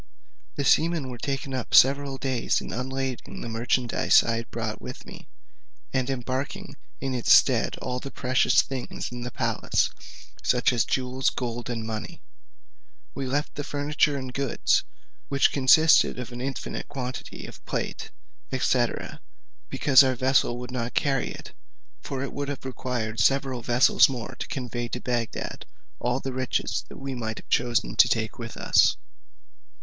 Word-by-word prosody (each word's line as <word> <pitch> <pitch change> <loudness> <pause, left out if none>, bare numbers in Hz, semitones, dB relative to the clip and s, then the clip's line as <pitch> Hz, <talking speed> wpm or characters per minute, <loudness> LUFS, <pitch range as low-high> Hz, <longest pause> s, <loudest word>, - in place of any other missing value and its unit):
The 140 - -2
seamen 160 -5 +2
were 120 - -8
taken 135 +1 -3
up 130 -3 -1
several 140 0 +5
days 130 -3 0
in - - -7
unlading 130 +1 -4
the - - -5
merchandize 120 +2 +3
I 115 0 -1
brought - - -5
with - - -8
me, - - -11 0.7
and 130 -1 0
embarking 130 +1 -4 0.2
in 135 0 -3
its 125 -2 0
stead - - +5
all 125 0 -2
the 135 - -7
precious 130 -1 +3
things 130 -3 -5
in 120 0 -6
the 120 - -4
palace, - - 0 0.5
such 125 0 +2
as 120 -1 +2
jewels, 130 0 0
gold, 120 -1 -4
and 115 -2 -3
money. 110 -1 -6 0.9
We 135 -1 -4
left 145 +3 -1
the 145 - -4
furniture 145 0 0
and 130 -2 -6
goods, 135 -1 +1 0.5
which 140 -1 +3
consisted 150 +4 +5
of 125 -1 -6
an 120 0 -6
infinite 135 0 -4
quantity 130 -3 -6
of - - -12
plate, - - -4 0.5
&c., - - +3 0.8
because 140 -1 +6
our 130 -1 +1
vessel 130 -1 +2
could 125 0 -7
not 125 -1 -3
carry 135 -2 +1
it, - - -10 0.5
for 135 -1 -4
it 140 - -5
would 145 0 -3
have 140 -2 -6
required 125 -4 -3
several 135 -2 +2
vessels 120 +4 +5
more 125 -4 -5
to - - -4
convey 120 -2 -4
to 125 - -4
Bagdad 120 -2 -3 0.3
all 125 +1 0
the 135 -1 -5
riches 130 0 -1
that - - -10
we 135 0 -5
might 110 -3 -4
have - - -11
chosen 120 - +1
to - - +8
take - - -1
with - - -7
us. - - +4
130 Hz, 160 wpm, -26 LUFS, 120-135 Hz, 0.9 s, to